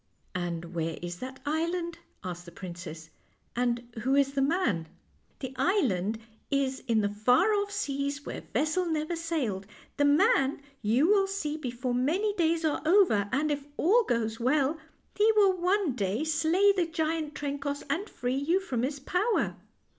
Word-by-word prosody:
"And 175 -1 -4
where 165 -1 -2
is 175 0 -4
that 260 +3 -7
island?' 335 +3 -1 0.2
asked 175 -2 -6
the 170 - -11
princess, 170 -3 -8 0.2
" - - -41
and 240 0 0
who 265 +4 +2
is 280 -1 +3
the 275 - +1
man? 270 - +1 0.2
" - - -38
" - - -39
The 260 -1 -5
island 230 - +1 0.3
is 270 -1 0
in 225 -2 +3
the 205 - +1
far 245 - +3
off 405 -1 0
seas 280 -6 -2
where - - -5
vessel 310 +8 0
never 315 +1 -1
sailed; 285 - -2 0.3
the 285 - +3
man 285 - +3 0.2
you 235 +7 +3
will 395 -1 +4
see 360 -7 -2
before 250 -4 -3
many 335 +12 +1
days 330 -3 +1
are 305 - 0
over; 315 - +4
and 300 +3 +1
if 290 -1 -2
all 440 +9 +4
goes 225 - -1
well, 280 +5 +2 0.4
he 430 +2 +5
will 400 -3 +5
one 365 -3 +1
day 210 +3 -1
slay 325 +6 +3
the 360 -4 +1
giant 320 -2 -2
Trencoss, 285 0 -3
and 400 +5 -2
free 245 +1 -2
you 290 +8 +2
from 260 -12 -2
his 275 +3 -2
power." 365 - 0
285 Hz, 170 wpm, -29 LUFS, 235-340 Hz, 0.4 s, he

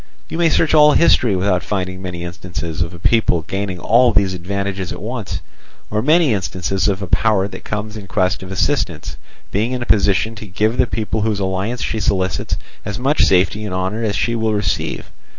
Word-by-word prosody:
You 165 - -4
may 170 -1 +4
search 160 0 +2
all 150 -1 +7
history 125 - +4
without 90 -1 +1
finding 95 -1 -3
many 90 -2 -5
instances 85 -1 -5
of 85 0 -1
a 85 - -9
people 90 -3 +2
gaining 95 +1 -3
all 120 +5 +4
these 100 -3 +2
advantages 95 +1 -3
at - - -6
once, 110 -1 -4 0.5
or 105 0 +1
many 155 0 +4
instances 95 0 -1
of 100 -1 0
a - - -1
power 100 +1 +2
that - - -10
comes 105 0 -4
in 105 -3 -8
quest 95 +1 0
of 95 0 -8
assistance 95 -9 -1 0.4
being 110 +5 0
in 125 -1 -2
a - - -6
position 100 0 +2
to 105 - -8
give 105 +4 +1
to 120 - -7
the - - +3
people 110 -1 -2
whose 105 -1 0
alliance 95 +5 -2
she 110 - -2
solicits 95 -2 0 0.3
as 100 0 -4
much 135 +5 +1
safety 95 +3 +3
and 100 -3 -4
honour 95 +4 -2
as 105 -2 0
she 115 +2 0
will 110 -1 0
receive. 100 -6 -2
100 Hz, 205 wpm, -19 LUFS, 95-110 Hz, 0.5 s, all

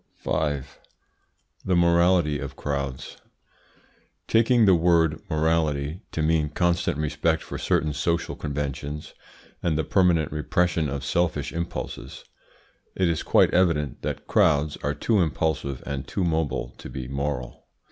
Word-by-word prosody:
5. 75 -3 -2 0.8
THE 95 - +1
MORALITY 85 -3 +3
OF 70 -1 -6
CROWDS. 70 -2 -4 1.1
Taking 115 0 +4
the 95 - +6
word 85 -2 +3
"morality" 80 0 0
to 80 - -2
mean 80 -1 +2
constant 85 -1 0
respect 75 +1 0
for - - -6
certain 75 0 +1
social 85 +4 -1
conventions, 75 0 -4 0.5
and 80 -3 0
the 80 - +1
permanent 85 -5 +2
repression 80 +1 0
of 70 0 -4
selfish 85 +3 0
impulses, 85 0 -5 0.7
it 95 - +2
is 80 - 0
quite - - +3
evident 85 -7 +1
that - - -4
crowds 75 -1 +2
are 75 +1 -2
too 105 +8 +1
impulsive 75 -4 -1
and 70 -2 -4
too 95 - -2
mobile 80 -7 -1
to - - -8
be 65 -2 -6
moral. 70 -2 -4
80 Hz, 130 wpm, -25 LUFS, 70-85 Hz, 1.1 s, the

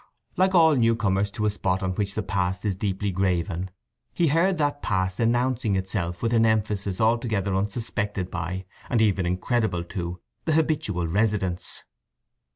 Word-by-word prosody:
Like 190 +1 +3
all 160 -3 +6
newcomers 110 -5 +2
to 105 +2 -3
a 105 - +3
spot 95 -2 -1
on 95 - 0
which 100 +1 -2
the 110 - -1
past 95 0 -1
is 100 -3 0
deeply 100 +1 -2
graven 90 -1 -1 0.4
he 170 -3 +2
heard 170 +5 +2
that 145 -1 0
past 95 -1 -1
announcing 120 -2 +1
itself 95 -2 -2
with 115 0 +1
an 115 -1 +4
emphasis 105 -3 0
altogether 110 -4 +1
unsuspected 100 -2 -2
by, 90 +2 -4 0.2
and 120 - +2
even 100 -5 +2
incredible 95 0 0
to, 90 -1 -5 0.3
the 160 - +1
habitual 155 - +1
residents. 100 -1 0
100 Hz, 155 wpm, -25 LUFS, 95-115 Hz, 0.4 s, all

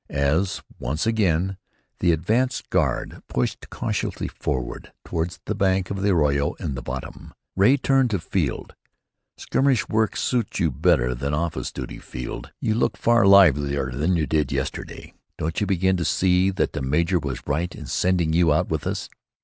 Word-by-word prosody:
As 80 +8 0 0.2
once 70 +7 -2
again 95 -4 +1 0.4
the 90 - +3
advance 115 - 0
guard 70 -10 0
pushed - - -2
cautiously - - -3
forward 60 -2 -4
toward 85 +1 -3
the - - -1
banks 95 -1 +1
of 100 -1 -3
the 100 - +2
arroyo 75 -5 +2
in 70 - -4
the 65 - -5
bottom, - - -7 0.2
Ray 105 +9 +5
turned 135 -2 +2
to 105 - 0
Field. 85 -5 -2 0.6
"Skirmish 135 -3 +1
work 110 -1 +1
suits 120 -6 -1
you 85 -5 +2
better 60 -1 +2
than 70 +4 -2
office 85 +1 -2
duty, - - -7
Field. - - -7
You 110 - 0
look 115 - 0
far 120 -3 +4
livelier 70 -8 +5
than 75 +8 0
you 80 - +1
did 75 -3 0
yesterday. - - -4 0.2
Don't 80 +4 -2
you 105 - +1
begin 95 0 +2
to 85 - -1
see 90 +3 +3
that 95 - -1
the - - -3
major 85 +7 +1
was 70 -5 -5
right 85 +5 -2
in - - -8
sending 90 -3 +1
you 85 -1 +4
out 75 - +1
with - - -2
us?" - - -3
85 Hz, 170 wpm, -23 LUFS, 75-100 Hz, 0.6 s, Ray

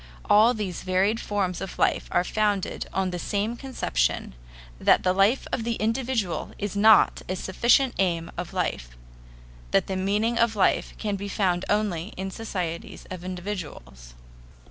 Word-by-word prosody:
All 220 +4 +6
these 195 -5 -4
varied 190 +4 +1
forms 190 -4 -2
of 195 - -6
life - - +1
are - - +3
founded 205 -1 -1
on 190 -1 -1
the 175 - -4
same 205 +6 -1
conception, 65 - -1 0.5
that - - +4
the 185 - +3
life 200 +7 +3
of 240 - 0
the 235 0 -1
individual 225 -4 -1
is 205 -1 -4
not 215 +1 +5
a 185 - -1
sufficient 240 +8 +2
aim 170 -3 0
of 175 -1 -5
life - - -3 0.7
that - - +2
the 190 - -3
meaning 210 +5 0
of 230 -1 +2
life 195 - +1
can 205 -2 -2
be 200 +1 -5
found 185 -3 0
only 205 -3 -1
in 190 +1 -4
societies 180 -6 -5
of 180 -2 -6
individuals. 165 - -7
195 Hz, 155 wpm, -25 LUFS, 180-215 Hz, 0.7 s, All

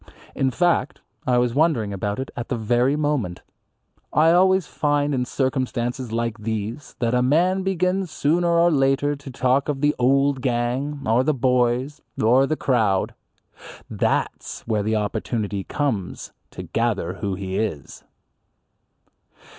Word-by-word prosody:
In 135 - +1
fact 170 -2 +1 0.3
I 125 -1 +3
was 120 -1 +1
wondering 135 -9 +1
about 100 +1 -3
it 130 - -5
at 120 - -5
the - - 0
very 120 +5 +2
moment. 145 -12 -1 0.7
I 160 +2 +4
always 185 0 +4
find 145 -1 0
in 125 -2 0
circumstances 130 -2 -2
like 115 -1 -2
these 110 +5 -4
that 120 -1 0
a 125 - +3
man 175 +9 +2
begins 185 0 0
sooner 165 +4 +1
or 170 0 +4
later 140 0 +2
to 140 -1 -11
talk 130 +2 +1
of 140 -2 -1
the 150 0 +3
"old 135 +2 +2
gang" 130 +3 -1
or 115 +3 +3
"the 155 +1 +1
boys" 125 +3 +1 0.2
or 125 +5 +4
"the 155 - -1
crowd." 110 -7 +1 0.8
That's - - -1
where 110 -2 -1
the 110 +2 0
opportunity 105 -1 -2
comes 120 -11 -3
in - - -35 0.2
to - - -6
gather 110 -7 -1
who 100 -2 -1
he 95 0 -3
is. 100 -11 -4
130 Hz, 145 wpm, -23 LUFS, 115-145 Hz, 0.8 s, I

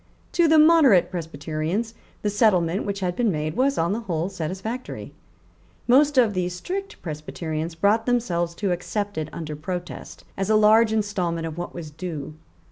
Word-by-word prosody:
To 340 -1 +3
the 315 0 +5
moderate 305 - +6
Presbyterians 165 +6 -3 0.3
the 210 - +1
settlement 195 -4 +2
which 200 0 -3
had 180 -1 -1
been 235 -4 +2
made 155 -1 -2
was 270 +3 +2
on 170 +4 +1
the 220 - -2
whole 175 -5 -2
satisfactory. 190 +7 -5 0.7
Most 285 +3 +4
of 235 -5 +5
the 180 -1 -1
strict 375 - -5
Presbyterians 160 +1 -4
brought 205 +7 +2
themselves 175 -9 0
to 200 -1 -1
accept 205 +3 -3
it 155 -1 -3
under 155 -3 -6
protest, 175 +4 -6
as 195 +1 -2
a 220 - +4
large 215 +1 +5
instalment 185 -6 -1
of 160 -1 -5
what 175 +1 -6
was 160 -3 -7
due. 155 -2 -6
185 Hz, 165 wpm, -24 LUFS, 165-225 Hz, 0.7 s, moderate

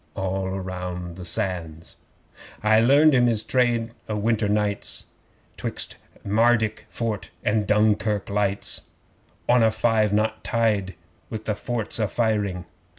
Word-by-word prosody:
(All 95 0 -2
round 90 -2 -5
the 90 -1 -8
Sands!) 85 -4 -3 0.7
'I 110 +1 +5
learned 140 +6 +6
him 125 -2 +4
his 110 -2 +1
trade 120 -3 +1 0.2
o' 105 - -1
winter 105 0 +1
nights, 105 -1 -1 0.5
'Twixt - - -4 0.3
Mardyk 110 +1 +2
Fort 110 -4 -3 0.2
and 105 -1 +1
Dunkirk 105 -1 +2
lights 100 -1 0 0.7
On 125 0 +5
a 110 - +5
five 110 -1 +2
knot 110 +1 0
tide 105 -5 0 0.3
with 110 -1 -6
the 105 - 0
forts 115 +1 -2
a 110 - +2
firing. 100 -5 -1
105 Hz, 130 wpm, -24 LUFS, 100-115 Hz, 0.7 s, learned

